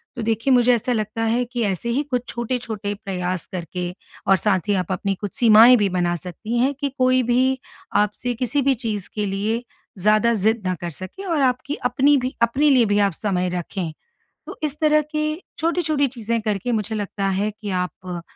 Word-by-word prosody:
तो 240 - -4
देखिए 225 +4 0
मुझे 245 0 +5
ऐसा 240 +2 -1
लगता 220 0 -2
है 230 +2 +1
कि 240 0 -4
ऐसे 195 +3 -2
ही 260 +5 +1
कुछ 250 -4 -2
छोटे-छोटे 230 -4 -3
प्रयास 185 -2 -2
करके 180 0 -4 0.4
और 195 - +6
साथ 190 -3 0
ही 205 - +2
आप 180 - -6
अपनी 195 +1 -1
कुछ 205 - -4
सीमाएँ 230 +1 +8
भी 205 -3 +2
बना 175 -1 0
सकती 185 +7 -5
हैं 270 +3 +2
कि 285 -1 -1
कोई 255 0 +3
भी 255 +2 +2 0.4
आपसे 235 +4 -3
किसी 280 +3 +1
भी 270 0 +3
चीज़ 205 -3 -2
के 210 -1 -1
लिए 210 +4 -1 0.4
ज़्यादा 215 +4 +3
ज़िद 220 +2 +1
ना 185 - +1
कर 175 - -3
सके 190 - -8
और 330 -6 0
आपकी 255 +2 0
अपनी 285 +2 +4
भी 255 0 -3
अपने 265 +6 +3
लिए 255 -4 +5
भी 205 - +3
आप 195 - -4
समय 180 -1 -1
रखें। 175 -1 -4 0.6
तो - - -8
इस 300 -1 -2
तरह 305 -1 +4
की 305 +1 -3 0.3
छोटी-छोटी 315 -3 +1
चीज़ें 230 +1 -1
करके 215 +2 -1
मुझे 220 0 -1
लगता 200 -1 -2
है 200 +3 0
कि 210 0 -8
आप 180 -1 -3
225 Hz, 195 wpm, -22 LUFS, 195-255 Hz, 0.6 s, सीमाएँ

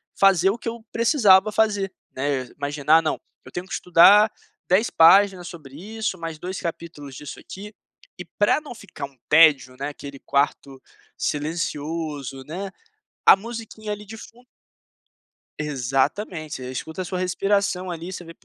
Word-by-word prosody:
fazer 190 -2 +4
o 205 - -1
que 235 - -9
eu 230 0 -5
precisava 215 -5 +4
fazer, 205 -3 +1 0.2
né. 135 -1 -1
Imagina, 145 +2 +2
ah, 165 - +3
não, 155 - -2 0.3
eu - - -12
tenho 175 +1 -5
que - - -8
estudar 200 +5 +6 0.4
10 190 +6 +3
páginas 185 +2 +5
sobre 145 -6 -11
isso, 210 +3 -4
mais 165 -2 -6
2 185 +3 -5
capítulos 160 -5 -7
disso 150 +1 -9
aqui 210 +3 -10 0.4
e 180 - -8
pra 205 - +1
não 290 -5 -9
ficar 205 -9 -8
um 135 -2 -16
tédio, 150 -5 +5
né, 140 +1 -3
aquele 140 -1 -10
quarto 140 -1 -1 0.4
silencioso, 150 -3 -3
né, 190 +5 -6 0.5
a - - +9
musiquinha 220 0 -7
ali 210 0 -6
de 220 +2 -10
fun 235 +3 -14 1.2
Exatamente. 150 - -2
Você 125 - -6
escuta 160 +7 -5
a - - -4
sua 180 +1 -4
respiração 185 0 0
ali, 170 +2 -6
você 180 -1 -7
vê 165 0 -12
175 Hz, 155 wpm, -23 LUFS, 145-200 Hz, 1.2 s, a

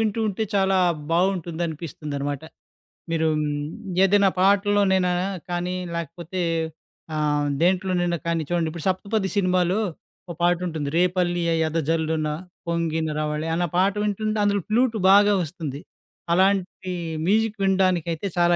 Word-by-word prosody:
వింటూ 220 0 0
ఉంటే 210 +2 -1
చాలా 195 -1 +3 0.4
బావుంటుంది 175 -1 0
అనిపిస్తుందనమాట. 145 -3 -5 0.7
మీరూ 160 -1 +1
హ్మ్, 150 +5 -3
ఏదైనా 200 0 +4
పాటల్లోనైనా 195 -1 +3 0.4
కానీ 175 +1 -2 0.2
లేకపోతే, 170 +2 -5 0.7
ఆహ్, 150 -1 +1
దేంట్లోనైనా 180 -1 +1
కానీ 165 -1 +1
చూడండి 170 -2 0
ఇప్పుడు 165 -1 -7
'సప్తపది' 195 +1 0
సినిమాలో 185 0 +2 0.5
ఒక - - -4
పాటుంటుంది 175 -4 0
'రేపల్లె 175 0 +1 0.3
ఎదజల్లున 160 0 0 0.4
పొంగిన 165 -1 -1
రావళి' 150 +1 -2
అన్న 175 +1 +1
పాట 195 +2 +3
వింటుంటే 215 +1 -1
అందులో 200 -1 +2
ఫ్లూటు 230 +1 +2
బాగా 205 +1 +6
వస్తుంది. 155 -4 -6 0.5
అలాంటి 190 0 +1 0.4
మ్యూజిక్ 215 +1 +1
వినడానికైతే 185 -2 +1
చాలా 175 0 +4
175 Hz, 115 wpm, -24 LUFS, 160-195 Hz, 0.7 s, బాగా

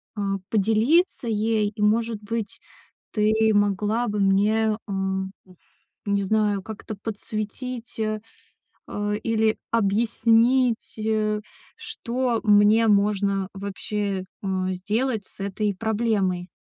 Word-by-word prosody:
а, 200 -2 -1
поделиться 225 - +2
ей. 215 -1 +1
И 215 - -5
может 220 +1 +1
быть, 225 0 -4 0.5
ты 215 0 +2 0.2
могла 205 +3 +1
бы 210 -1 -2
мне, 210 +3 +3
эм, 190 -1 -2
уф 185 -1 -19 0.5
не 200 0 +2
знаю, 210 0 +1
как-то 215 +1 -7
подсветить, 225 +4 -6
э, 215 -1 -1 0.7
а, 205 0 -2
или 220 0 +1
объяснить, 230 +3 +2
э, 215 -1 0 0.4
что 255 - -2
мне 210 +2 +5
можно 200 -2 +2
вообще, 200 0 -3 0.2
э, 185 -1 -1
сделать 215 +4 -1
с - - -17
этой 200 +1 -1
проблемой. 205 -4 0
210 Hz, 110 wpm, -24 LUFS, 200-225 Hz, 0.7 s, мне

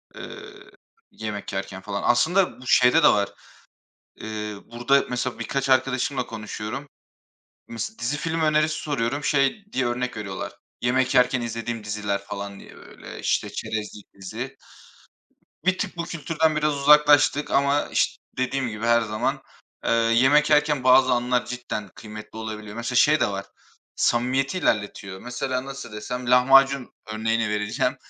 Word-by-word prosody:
eee, - - -8 0.7
yemek 105 -2 -6
yerken, 95 -1 -4
falan. 100 0 -4
Aslında 160 +5 +2
bu 125 - -11
şeyde 130 +7 +5
de - - +9
var. 100 -1 +2 0.9
Eee, 105 -1 -5
burada 120 +4 +2
mesela 125 -1 -3
birkaç 135 +3 -2
arkadaşımla 130 0 +1
konuşuyorum. 110 +4 -6 0.8
Mes 115 0 -6
dizi 130 +5 -1
film 165 +1 -2
önerisi 155 0 +2
soruyorum. 145 0 -2
Şey 145 +9 +1
diye 130 -1 +1
örnek 125 0 -2
veriyorlar. 100 -3 -5 0.3
Yemek 130 +1 +1
yerken 125 0 +4
izlediğim 115 -1 -4
diziler, 105 -1 -2
falan 100 -1 -7
diye - - -14
böyle, - - -11
işte, - - 0
çerezlik 105 -1 -6
dizi. 115 +8 -7 1.1
Bir 185 0 +2
tık - - -3
bu 170 - -2
kültürden 160 -1 0
biraz 150 -1 +1
uzaklaştık 145 0 +5
ama 140 +1 +3
iş - - 0 0.2
dediğim 130 0 -1
gibi 110 +1 -4
her 120 0 +5
zaman, 110 -1 -2 0.4
eee, - - 0
yemek 130 +7 +4
yerken 150 -3 +3
bazı 130 0 +6
anlar 125 0 +1
cidden 125 -4 -5
kıymetli 110 0 -10
olabiliyor. 110 -1 -6
Mesela 115 +2 -3
şey 150 +5 +5
de - - +4
var, 100 0 -4 0.5
samimiyeti 130 +7 +1
ilerletiyor. 100 - -1
Mesela, 125 +1 -3
nasıl 135 -5 -8
desem? 125 +3 -4
Lahmacun 135 +1 +5 0.2
örneğini 110 0 0
vereceğim. 105 +5 -1
125 Hz, 140 wpm, -24 LUFS, 110-140 Hz, 1.1 s, de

